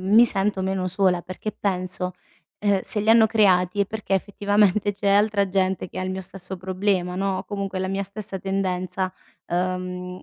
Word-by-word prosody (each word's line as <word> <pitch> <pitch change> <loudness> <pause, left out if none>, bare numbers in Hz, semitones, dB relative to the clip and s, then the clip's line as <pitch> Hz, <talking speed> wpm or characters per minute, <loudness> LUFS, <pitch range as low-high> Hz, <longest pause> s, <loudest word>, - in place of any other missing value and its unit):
mi 210 +6 +6
sento 195 -3 +1
meno 190 -1 -1
sola 185 -1 +1
perché 185 +3 -5
penso, 185 -1 -2 0.5
uhm, 205 -2 +2
se 210 - -2
li 215 +2 +2
hanno 225 -1 +7
creati 200 -3 +3
è 200 - +4
perché 210 -2 -2
effettivamente, 205 +1 +2
c'è 200 0 -2
altra 200 0 +3
gente 190 -1 0
che - - -8
ha - - -2
il 185 - -2
mio 190 - -4
stesso 190 +1 -7
problema, 185 0 -1
no, 195 0 0
o - - -6
comunque 195 -2 -4
la 190 - -1
mia 195 +1 -1
stessa 195 0 -6
tendenza, 185 -1 -2 0.4
uhm, 180 +1 -2
190 Hz, 180 wpm, -24 LUFS, 185-205 Hz, 0.5 s, hanno